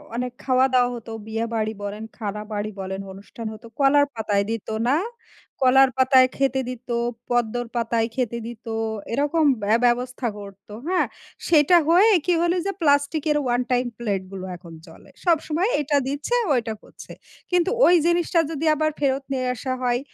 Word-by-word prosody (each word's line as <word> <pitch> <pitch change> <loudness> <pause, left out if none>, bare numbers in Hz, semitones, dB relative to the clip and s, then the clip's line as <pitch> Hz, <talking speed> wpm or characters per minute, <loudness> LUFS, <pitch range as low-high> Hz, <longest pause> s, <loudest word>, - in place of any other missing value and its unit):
অনেক 250 0 -2
খাওয়া-দাওয়া 255 -1 +3
হতো। 230 -1 -9 0.2
বিয়েবাড়ি 225 0 -2
বলেন, 205 +2 -5
খানাবাড়ি 210 0 -4
বলেন, 190 0 -4
অনুষ্ঠান 205 +4 -10
হতো 215 +2 -13
কলার 285 +1 +5
পাতায় 205 -2 0
দিত, 225 -2 -4 0.2
না? 275 - +3 0.7
কলার 265 +1 +6
পাতায় 260 0 +5
খেতে 270 -1 +1
দিত, 250 0 -8 0.4
পদ্মর 240 0 0
পাতায় 230 -1 0
খেতে 235 -2 -1
দিত, 240 +1 -10 0.5
এরকম 295 +4 +1 0.2
ব্য 200 - -2 0.2
ব্যবস্থা 245 +1 0
করত, 200 -1 -12 0.2
হ্যাঁ? 365 -1 +1 0.4
সেটা 320 +2 +5
হয়ে 380 +7 +6
কি 360 - +3
হল? 345 0 +2
যে, 395 - 0
প্লাস্টিকের 295 +1 +2
ওয়ান 245 0 +1
টাইম 250 0 +2
প্লেট 205 -5 -1
গুলো 190 -1 -6
এখন 170 -2 -13
চলে। 160 - -16 0.2
সবসময় 335 +3 +1
এটা 290 0 +1
দিচ্ছে, 290 - -2
ও - - +2
এটা 225 -1 -4
করছে। - - -13 0.4
কিন্তু 355 0 +2 0.2
ওই 355 - +6
জিনিসটা 345 0 +2
যদি 320 +1 -3
আবার 310 +1 0
ফেরত 275 -1 0
নিয়ে 255 -1 -1
আসা 255 +2 -3
হয়? 245 -1 +1
250 Hz, 160 wpm, -23 LUFS, 225-290 Hz, 0.7 s, কলার